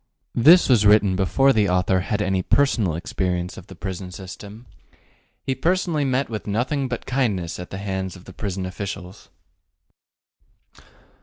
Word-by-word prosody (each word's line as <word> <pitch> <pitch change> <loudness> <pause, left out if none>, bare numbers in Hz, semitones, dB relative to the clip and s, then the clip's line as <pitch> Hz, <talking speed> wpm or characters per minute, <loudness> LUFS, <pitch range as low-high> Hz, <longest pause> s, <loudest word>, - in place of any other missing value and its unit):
This 160 +9 +6
was 120 -6 +4
written 105 -2 +5
before 135 +9 +3
the 105 -4 +2
author 90 +1 +2
had 105 +3 -1
any 95 -2 0
personal 110 - +2
experience 90 -2 -2
of 95 - -12
the 95 - -11
prison 95 0 -6
system. 100 +5 -10 0.8
He 135 - -1
personally 165 +1 0
met 130 +1 0
with 110 -2 -6
nothing 130 +7 -1
but 120 -1 -5
kindness 105 -12 -1
at 90 - -7
the 95 - -6
hands 95 -1 -4
of 90 - -14
the 95 - -11
prison 95 -2 -4
officials. 95 -1 -7
100 Hz, 150 wpm, -23 LUFS, 95-125 Hz, 0.8 s, This